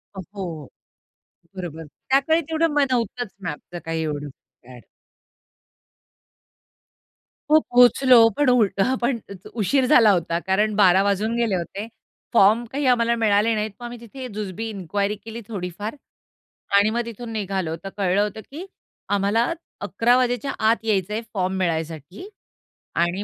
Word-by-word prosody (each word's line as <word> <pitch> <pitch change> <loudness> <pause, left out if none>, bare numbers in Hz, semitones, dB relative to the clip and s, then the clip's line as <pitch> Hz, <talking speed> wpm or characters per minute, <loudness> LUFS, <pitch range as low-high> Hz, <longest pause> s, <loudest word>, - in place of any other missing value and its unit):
अ, - - -6 0.2
हो. 165 -7 -6 0.9
बरोबर. 165 -3 -6 0.2
त्याकाळी 280 +5 +3
तेवढं 320 +1 +2
म 295 - +2
नव्हतंच 240 -2 -2
मॅपचं 175 +1 -6
काही 165 0 -2
एवढं 145 -1 -4
फॅड. 125 -2 -17 2.7
हो 310 - +8
पोहचलो. 245 -2 +6
पण 290 -3 +3
उ 245 -3 +5 0.2
हं 255 +6 +2
पण 240 0 0 0.3
उशीर 240 +5 +1
झाला 235 -6 +6
होता 170 -2 0
कारण 210 +3 +1
12:00 190 -2 +5
वाजून 205 +3 0
गेले 235 -4 +1
होते. 195 +5 -5 0.5
फॉर्म 220 +2 +5
काही 280 +1 -2
आम्हाला 235 0 +1
मिळाले 220 0 +2
नाहीत. 215 0 -2
मग 240 - -8
आम्ही 240 -1 -7
तिथे 255 +3 -8
जुजबी 210 +1 -5
इन्क्वायरी 200 +1 -2
केली 225 +2 -9
थोडीफार 205 - -5 0.8
आणि 205 +1 +4
मग 235 +2 -1
तिथून 235 0 -8
निघालो 190 -6 -2
तर 195 - -5
कळलं 195 0 +2
होतं, 210 +1 -3
की 335 +6 -7 0.5
आम्हाला 205 +4 +2 0.4
अकरा 225 +4 +2
वाजायच्या 250 +2 0 0.2
आत 225 0 0
यायचं 205 -2 0
आहे 225 - -2
फॉर्म 190 -2 -1
मिळायसाठी. 165 - -3 0.7
आणि 175 +4 0
210 Hz, 140 wpm, -23 LUFS, 185-240 Hz, 2.7 s, हो